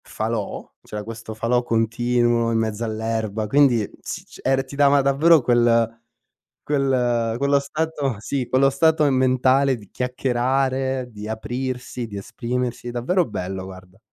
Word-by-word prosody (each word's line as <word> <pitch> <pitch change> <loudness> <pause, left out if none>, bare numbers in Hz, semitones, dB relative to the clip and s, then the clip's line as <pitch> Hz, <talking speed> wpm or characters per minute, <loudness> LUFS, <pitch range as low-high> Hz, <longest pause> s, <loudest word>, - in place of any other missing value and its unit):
falò, 110 -1 -4 0.2
c'era 105 0 -6
questo 115 0 -8
falò 120 +3 +1
continuo, 120 +1 +1
in 115 - +2
mezzo 110 0 -2
all'erba 110 -1 -2
quindi 130 -6 +4
s - - -6
c - - -15
er 135 0 +1
ti 135 +1 -10
dava 140 0 +5
davvero 145 +3 +5
quel 115 -1 +2 0.6
quel 125 -5 +1
quello 140 +1 +2
stato 145 -2 -2
sì, 130 +2 -3
quello 135 +1 +3
stato 160 +3 +3
mentale 130 +1 +3
di 105 -4 -14
chiacchierare, 130 +1 -1
di 105 0 -8
aprirsi, 125 +2 -4
di 100 - -9
esprimersi, 120 +4 -4
davvero 150 +10 +1
bello 95 -4 -5
guarda. 95 +1 -13
120 Hz, 135 wpm, -22 LUFS, 115-135 Hz, 0.6 s, dava